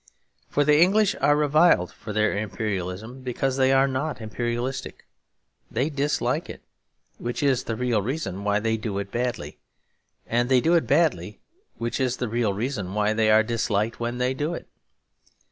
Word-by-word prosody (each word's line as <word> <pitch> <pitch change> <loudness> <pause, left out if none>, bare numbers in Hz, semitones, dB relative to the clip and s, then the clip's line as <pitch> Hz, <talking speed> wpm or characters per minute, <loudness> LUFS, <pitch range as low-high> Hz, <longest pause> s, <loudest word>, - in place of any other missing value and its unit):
For 145 - +2
the 150 +1 +4
English 200 +3 +4
are 145 - +4
reviled 150 - +3
for 110 - -8
their 110 -1 +1
imperialism 105 +2 -4
because 130 +1 -2
they 130 0 +4
are 135 0 +4
not 140 +3 -2
imperialistic. 120 +3 -4 0.6
They 130 +7 -1
dislike 145 +1 -1
it, - - -9 0.6
which 120 +4 -3
is 130 -3 +2
the 115 - -2
real 120 -3 0
reason 100 - -4
why 105 0 +1
they 110 0 0
do 105 -2 -4
it 100 0 -4
badly; 120 -1 -3 0.7
and 120 +2 0
they 130 -1 +5
do 165 +7 +2
it 170 - +3
badly, 130 - +1 0.4
which 115 +3 -3
is 130 -1 0
the 125 - -2
real 115 -2 +1
reason 100 -3 -3
why 105 0 +2
they 110 0 +2
are 110 +1 +6
disliked 110 -1 -1
when 120 +1 -3
they 125 +1 0
do 150 +5 -2
it. - - -9
120 Hz, 170 wpm, -25 LUFS, 110-135 Hz, 0.7 s, are